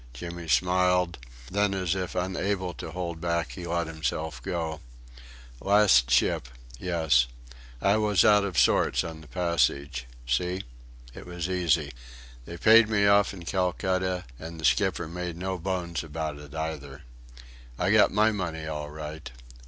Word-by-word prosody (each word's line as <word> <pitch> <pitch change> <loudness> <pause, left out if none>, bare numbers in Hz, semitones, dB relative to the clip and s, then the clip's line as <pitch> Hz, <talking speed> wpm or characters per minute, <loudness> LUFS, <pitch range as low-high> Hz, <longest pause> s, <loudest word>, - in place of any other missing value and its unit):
Jimmy 85 +5 -7
smiled 90 -1 +2 0.3
then 100 0 +1
as 95 -3 0
if 95 -2 -4
unable 95 0 -1
to - - -7
hold 85 -2 -5
back 85 -1 -1
he 90 -2 -7
let 85 0 0
himself 80 -3 -3
go: 80 -3 -3 0.8
"Last 100 -12 +4
ship - - +2 0.3
yes. 80 -9 +2 0.6
I 100 +2 +4
was 105 -3 +3
out 105 -1 +6
of 95 -5 -3
sorts - - +3
on 80 -1 -7
the 80 - -14
passage. 70 -7 0 0.2
See? 90 +10 -1 0.5
It - - -11
was 90 -1 -4
easy. 85 -5 +1 0.5
They 85 - -8
paid 115 +1 +6
me 100 -2 +2
off 100 0 +4
in 90 -3 -10
Calcutta, 95 0 -1
and 80 +1 -8
the 80 - -3
skipper 95 -5 +2
made 90 0 -5
no 95 +1 -3
bones 85 -2 -3
about 80 -1 -5
it 75 +1 -12
either.... 75 -4 -5 0.7
I - - +1
got - - +6
my 105 +2 +3
money 85 -6 -4
all 75 -1 -4
right. 75 0 -7
85 Hz, 150 wpm, -27 LUFS, 80-95 Hz, 0.8 s, out